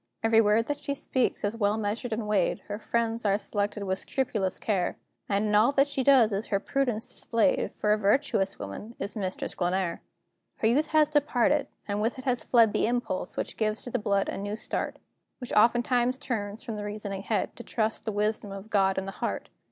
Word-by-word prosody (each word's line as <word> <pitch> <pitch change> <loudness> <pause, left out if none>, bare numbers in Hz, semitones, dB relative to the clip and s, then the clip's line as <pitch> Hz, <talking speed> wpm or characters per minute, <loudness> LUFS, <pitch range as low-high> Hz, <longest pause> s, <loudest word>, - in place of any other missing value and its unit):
Every 225 0 +5
word 215 +1 +3
that 290 +2 -3
she 280 - -3
speaks 260 -2 -1
is 205 +2 0
well 210 -1 +1
measured 220 +3 -2
and 220 -1 -2
weighed; 205 -1 +1
Her 205 +1 -6
friends 230 0 -1
are 200 -1 +3
selected 205 0 -2
with 190 -1 -1
scrupulous 215 -8 -1
care; 195 -5 -1 0.3
And 200 +1 +1
in - - 0
all 215 +5 +5
that 275 0 +4
she 280 -2 -2
does 255 -5 +6
is 200 +3 -2
her 200 - +1
prudence 245 -2 -1
displayed, 230 +4 +1
For 210 0 +1
a 215 - 0
virtuous 200 -2 +1
woman 105 - -7
is 200 - -4
Mistress 190 -3 -3
Glenare! 180 -1 -1 0.5
Her 220 - +1
youth 285 +7 +3
has 305 -1 +3
departed, 290 -1 +2 0.2
and 205 0 -1
with 225 +4 0
it 260 - -9
has 250 -2 0
fled 230 -4 +4
The - - +2
impulse 235 -7 -2
which - - -3
gives 215 -1 -1
to 245 - -7
the - - 0
blood 200 -2 +1
a - - -3
new 205 +1 -3
start, - - -3 0.4
Which 250 -2 -7
oftentimes 240 +3 +3
turns 220 -6 -4
from 225 -4 -5
the 205 - -4
reasoning 205 -2 -4
head, 215 +1 -1
To 240 - -8
trust 220 -2 -1
to - - -28
the 220 - -1
wisdom 210 0 -1
of 195 +3 -9
God 195 -2 +3
in 190 - -1
the 195 - -5
heart. - - -4
215 Hz, 215 wpm, -28 LUFS, 205-240 Hz, 0.5 s, does